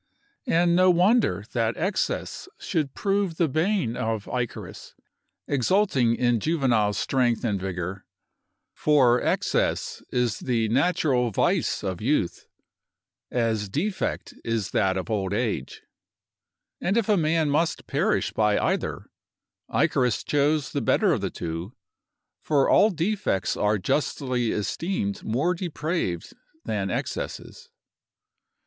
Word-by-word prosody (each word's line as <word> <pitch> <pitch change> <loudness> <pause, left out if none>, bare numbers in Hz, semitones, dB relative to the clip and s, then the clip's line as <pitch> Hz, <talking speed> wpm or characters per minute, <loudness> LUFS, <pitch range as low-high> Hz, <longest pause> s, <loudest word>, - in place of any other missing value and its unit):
And 170 -4 +3
no 185 +1 +5
wonder 180 - +3
that 115 -1 0
excess 195 - -2
should 155 -7 -2
prove 195 -4 0
the 170 - +3
bane 155 - 0
of 110 -2 -2
Icarus, 125 -2 -5 0.5
exulting 140 - +2
in 120 -2 +2
juvenile 120 -9 +1
strength 125 0 0
and 100 -4 -1
vigor; 90 0 -4 0.7
for 130 -5 +3
excess - - 0
is 125 -3 0
the 115 -3 0
natural 135 -2 +2
vice 105 - 0
of 95 -2 -3
youth, 115 - 0 0.8
as 110 -4 0
defect 185 - -2
is 115 -4 -2
that 95 -2 +1
of 95 +4 -4
old 100 -2 -1
age; 115 -1 -3 1.0
and 195 +5 +1
if 230 - +1
a 210 - +4
man 160 -3 +1
must 160 +3 0
perish - - 0
by 105 -1 +2
either, - - -1 0.7
Icarus 125 -4 +1
chose 145 0 +1
the - - -1
better - - +3
of - - -1
the - - -1
two; 85 +5 -5 0.7
for 145 -3 +2
all 210 - +5
defects 180 - -1
are 105 +1 +1
justly 125 - -1
esteemed 105 - -2
more 140 +11 +1
depraved 165 - -3 0.3
than 105 -3 -2
excesses. - - -5
125 Hz, 120 wpm, -25 LUFS, 105-165 Hz, 1.0 s, no